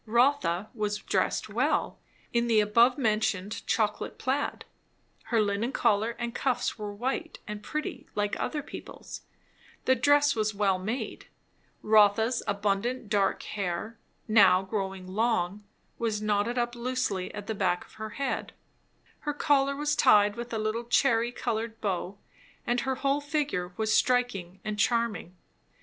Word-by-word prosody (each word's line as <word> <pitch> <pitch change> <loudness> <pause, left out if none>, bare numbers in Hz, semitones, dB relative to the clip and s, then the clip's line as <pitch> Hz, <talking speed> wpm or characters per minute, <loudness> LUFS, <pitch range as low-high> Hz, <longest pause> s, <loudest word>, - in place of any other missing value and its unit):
Rotha 235 -6 +2
was 210 -3 -1
dressed - - 0
well, - - 0 0.3
in 235 0 +2
the 225 -2 +4
abovementioned 215 -2 +2
chocolate 210 -2 0
plaid; 270 +3 -2 0.6
her 225 0 +1
linen 210 +3 0
collar 220 -2 +1
and 235 -1 -3
cuffs 245 -1 0
were 210 -2 -5
white 260 +10 -3
and 210 -1 -5
pretty 305 +7 -5
like 205 0 0
other 295 -2 -2
people's; - - -9 0.6
the 260 - +5
dress 285 +3 +4
was 215 -1 0
well 195 -2 +2
made; 220 +8 -4 0.6
Rotha's 220 +3 +4
abundant 205 +4 -1
dark 200 -2 +1
hair, 200 +3 -4 0.3
now 205 -4 +6
growing 190 -2 -4
long, 205 -1 0 0.3
was 220 -3 0
knotted 210 +3 0
up 240 0 0
loosely 240 -6 -2
at 205 - -6
the 220 - -2
back 185 -3 0
of - - -21
her 220 - -4
head, 280 -1 -2 0.7
her 295 -1 -3
collar 280 -2 +2
was 295 +1 0
tied 205 -4 +5
with 235 0 -6
a 225 - -1
little 215 +2 -2
cherry 240 -1 +3
coloured 225 -2 -3
bow; 195 -1 -2 0.5
and 240 +1 +1
her 265 +1 -1
whole 275 +2 0
figure 285 - -1
was 220 -1 +1
striking 210 -9 +1
and 210 -1 -3
charming. 215 -6 0
220 Hz, 140 wpm, -28 LUFS, 205-245 Hz, 0.7 s, now